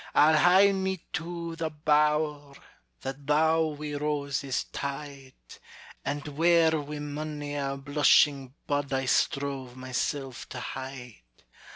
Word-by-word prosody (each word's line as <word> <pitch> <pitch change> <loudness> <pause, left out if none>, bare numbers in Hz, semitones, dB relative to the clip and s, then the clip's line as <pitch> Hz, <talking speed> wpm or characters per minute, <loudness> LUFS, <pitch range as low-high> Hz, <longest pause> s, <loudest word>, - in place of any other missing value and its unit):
I'll 155 +2 +6
hie 185 +5 +6
me 190 -2 -2
to 170 0 -4
the 165 -1 -2
bower 150 -1 +1 0.5
That 135 +1 -6
thou 160 +2 +3
wi' 150 -1 -5
roses 145 -2 -1
tied, 140 -1 -6 0.7
And 145 +1 -3
where 165 +2 +4
wi' 150 -1 -3
mony 145 0 -5
a 140 -1 -2
blushing 140 -1 +3
bud 145 -1 -1
I 135 0 0
strove 135 -2 0
myself 130 +1 -3
to 130 - -6
hide. 125 - -7
145 Hz, 115 wpm, -28 LUFS, 135-155 Hz, 0.7 s, I'll